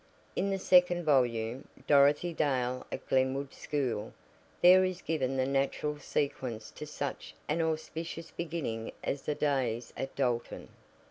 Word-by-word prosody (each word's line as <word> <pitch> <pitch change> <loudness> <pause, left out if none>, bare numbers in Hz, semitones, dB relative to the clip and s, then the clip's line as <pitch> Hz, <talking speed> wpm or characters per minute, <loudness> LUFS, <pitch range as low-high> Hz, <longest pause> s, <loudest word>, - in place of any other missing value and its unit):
In 200 - 0
the 195 - 0
second 180 -2 +4
volume, 125 -4 +1 0.2
"Dorothy 145 +4 +4
Dale 130 -5 0
at 135 - -6
Glenwood 130 +1 +1
School," 130 -8 -2 0.5
there 185 +1 +8
is 185 -1 -1
given 135 -4 -1
the 130 - +2
natural 140 +2 -1
sequence 125 -6 -3
to 150 - -8
such 145 -2 -5
an 155 +3 +1
auspicious 160 +1 -3
beginning 155 -10 -4
as 140 - -2
the 150 - -2
days 125 -6 -1
at 135 - -5
Dalton. 125 -3 -1
140 Hz, 135 wpm, -31 LUFS, 130-160 Hz, 0.5 s, there